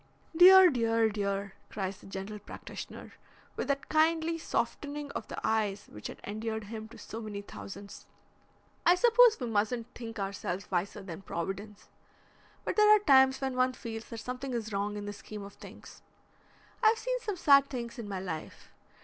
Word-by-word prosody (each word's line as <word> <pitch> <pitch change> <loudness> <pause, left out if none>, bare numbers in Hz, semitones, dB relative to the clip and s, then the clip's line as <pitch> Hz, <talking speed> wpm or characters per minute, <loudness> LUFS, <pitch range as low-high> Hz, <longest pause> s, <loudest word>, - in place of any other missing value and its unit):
"Dear! 370 +1 +9
dear! 230 -2 +2
dear!" 200 -1 -2 0.2
cries 195 -2 -4
the - - -14
general 195 +2 -6
practitioner, 205 - -9 0.4
with - - -3
that 280 0 -1
kindly 320 +1 +2
softening 290 -2 -3
of - - -5
the - - -5
eyes 215 -3 0
which 105 - -7
had - - -9
endeared 220 +1 -4
him 220 +1 -7
to 230 - -14
so 225 - -7
many 205 -2 -6
thousands. 200 0 -10 0.8
"I 350 - +6
suppose 475 +2 +6
we 250 - -2
mustn't 230 +2 -1
think 230 -1 -8
ourselves 195 -2 -4
wiser 185 +2 -2
than 175 -2 -8
Providence, 195 +4 -6 0.8
but - - -2
there 425 0 +6
are 425 - +9
times 265 -4 +5
when 265 -1 -2
one 255 0 +2
feels 225 -3 -7
that 230 - -8
something 250 +3 -5
is 220 -2 -4
wrong 205 +1 -1
in 205 - -5
the 205 - -5
scheme 210 0 -9
of 200 0 -10
things. - - -13 0.8
I've 445 -1 +5
seen - - -2
some 420 -4 -3
sad 280 -4 +6
things 235 -2 -5
in 215 -3 -6
my 195 -2 -3
life. 165 -4 -7
225 Hz, 175 wpm, -30 LUFS, 200-275 Hz, 0.8 s, Dear